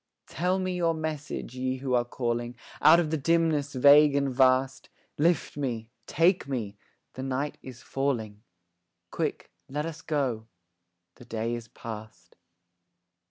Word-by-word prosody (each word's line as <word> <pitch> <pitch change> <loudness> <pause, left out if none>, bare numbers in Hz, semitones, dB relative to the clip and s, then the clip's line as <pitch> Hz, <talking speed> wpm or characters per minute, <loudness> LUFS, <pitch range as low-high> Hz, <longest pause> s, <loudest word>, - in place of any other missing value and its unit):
Tell 180 +3 -1
me 185 -1 -2
your 170 -2 +1
message, 155 -5 -4
Ye 130 0 -2
who 130 -1 -3
are 120 -1 +3
calling 120 0 -3 0.3
Out 155 +3 +8
of 160 -3 -1
the 160 - +1
dimness 155 -1 +1
vague 145 +2 +6
and 140 -2 +1
vast; 130 0 +2 0.3
Lift 165 -1 +1
me, 115 -5 -3 0.2
take 175 +1 +2
me, 115 -7 -3 0.4
the 130 - -7
night 135 +2 -3
is 130 -2 -11
falling; 115 -7 -2 0.7
Quick, - - -3 0.2
let 150 +3 -2
us 165 -1 -6
go, 130 -8 -2 0.7
the 125 - -14
day 115 0 -3
is 120 -1 -5
past. 110 -1 -10
135 Hz, 140 wpm, -28 LUFS, 120-155 Hz, 0.7 s, Out